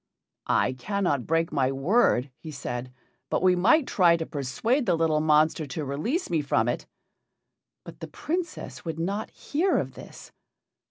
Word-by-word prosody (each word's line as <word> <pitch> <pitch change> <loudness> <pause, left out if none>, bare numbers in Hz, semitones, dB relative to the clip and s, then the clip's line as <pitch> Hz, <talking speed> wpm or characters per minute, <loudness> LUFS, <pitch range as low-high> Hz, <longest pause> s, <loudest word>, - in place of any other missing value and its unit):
"I 130 - +2
cannot 145 - -1
break 165 +1 +1
my 135 -3 +1
word," 135 - +2
he 160 - -9
said, 125 -3 -5 0.4
"but - - 0
we 185 -1 +5
might 245 - +4
try 175 -7 +4
to 165 - -3
persuade 220 - -1
the - - +3
little 160 -2 +2
monster 155 0 +3
to 145 +3 -4
release 155 - -2
me 165 -3 0
from 120 -5 +1
it." 120 - -2 1.0
But - - -11
the - - -7
Princess 340 +1 -4
would 165 -2 -4
not 195 +6 -2
hear 340 +7 0
of - - -2
this. - - -12
160 Hz, 160 wpm, -26 LUFS, 140-200 Hz, 1.0 s, we